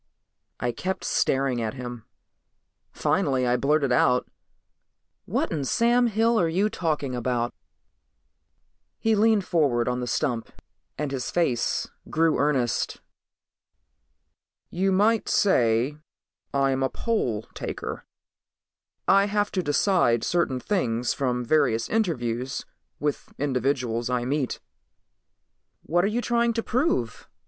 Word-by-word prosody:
I 120 Hz, 0 st, 0 dB
kept 185 Hz, +11 st, -4 dB
staring 135 Hz, -3 st, +1 dB
at 110 Hz, +3 st, -3 dB
him. 125 Hz, -3 st, -7 dB, 0.9 s
Finally 130 Hz, -2 st, +1 dB
I 120 Hz, 0 st, +2 dB
blurted 140 Hz, 0 st, +1 dB
out, 125 Hz, 0 st, +3 dB, 1.0 s
"What -, -, -1 dB
in 150 Hz, -4 st, -1 dB
Sam 240 Hz, -, +3 dB
Hill 225 Hz, +1 st, +2 dB
are 170 Hz, -, +3 dB
you 195 Hz, +6 st, +1 dB
talking 150 Hz, -6 st, -1 dB
about?" 120 Hz, -1 st, -1 dB, 1.4 s
He 225 Hz, -, +1 dB
leaned 215 Hz, -2 st, +3 dB
forward 135 Hz, -10 st, +1 dB
on 125 Hz, 0 st, 0 dB
the 125 Hz, -, -3 dB
stump 120 Hz, 0 st, -1 dB, 0.5 s
and 150 Hz, -1 st, -2 dB
his 130 Hz, -2 st, -3 dB
face 135 Hz, -10 st, 0 dB, 0.2 s
grew 160 Hz, 0 st, +2 dB
earnest. 135 Hz, -5 st, 0 dB, 1.7 s
"You 190 Hz, +2 st, +1 dB
might 210 Hz, +4 st, +2 dB
say 125 Hz, -, +2 dB, 0.5 s
I'm 135 Hz, -1 st, +1 dB
a 135 Hz, -, +1 dB
poll 125 Hz, -, -1 dB
taker. -, -, -5 dB, 1.0 s
I 195 Hz, +1 st, +5 dB
have 205 Hz, 0 st, 0 dB
to 185 Hz, -, 0 dB
decide 145 Hz, -, +2 dB
certain 170 Hz, -7 st, 0 dB
things 125 Hz, -, 0 dB
from 125 Hz, -2 st, -1 dB
various 125 Hz, -5 st, +2 dB
interviews 130 Hz, -, -1 dB, 0.3 s
with 145 Hz, -1 st, -3 dB
individuals 125 Hz, -4 st, -1 dB
I 125 Hz, -1 st, 0 dB
meet." 140 Hz, 0 st, -1 dB, 1.2 s
"What 175 Hz, +2 st, +1 dB
are -, -, +3 dB
you 225 Hz, +4 st, -1 dB
trying 235 Hz, -1 st, +1 dB
to 230 Hz, 0 st, -2 dB
prove?" 230 Hz, -, -1 dB
140 Hz, 120 wpm, -25 LUFS, 125-190 Hz, 1.7 s, I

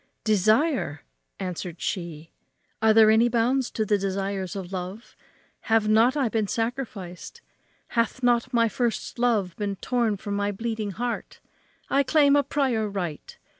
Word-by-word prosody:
"Desire!" 215 Hz, -, +2 dB, 0.4 s
answered 180 Hz, -2 st, -5 dB
she, 165 Hz, -4 st, -4 dB, 0.5 s
"are 220 Hz, 0 st, +5 dB
there 220 Hz, 0 st, +7 dB
any 230 Hz, +2 st, +4 dB
bounds 245 Hz, +2 st, +1 dB
to 220 Hz, -, -2 dB
the 205 Hz, 0 st, +2 dB
desires 195 Hz, -1 st, -3 dB
of 190 Hz, -1 st, -6 dB
love? 185 Hz, +5 st, -6 dB, 0.5 s
have 220 Hz, -1 st, +3 dB
not 225 Hz, +6 st, +4 dB
I 270 Hz, -4 st, +2 dB
been 220 Hz, -2 st, -1 dB
sacrificed? 225 Hz, -, -4 dB, 0.5 s
hath 235 Hz, +2 st, -1 dB
not 245 Hz, +1 st, +2 dB
my 230 Hz, -2 st, +3 dB
first 235 Hz, +1 st, -2 dB
love 215 Hz, -8 st, +1 dB
been 205 Hz, -2 st, -2 dB
torn 230 Hz, 0 st, 0 dB
from 200 Hz, +1 st, -4 dB
my 205 Hz, 0 st, 0 dB
bleeding 220 Hz, 0 st, -3 dB
heart? 235 Hz, +5 st, -4 dB, 0.5 s
I 275 Hz, -, +3 dB
claim 285 Hz, +1 st, +4 dB
a 290 Hz, -, +5 dB
prior 260 Hz, -6 st, 0 dB
right. 175 Hz, -7 st, -5 dB
220 Hz, 145 wpm, -25 LUFS, 195-240 Hz, 0.5 s, there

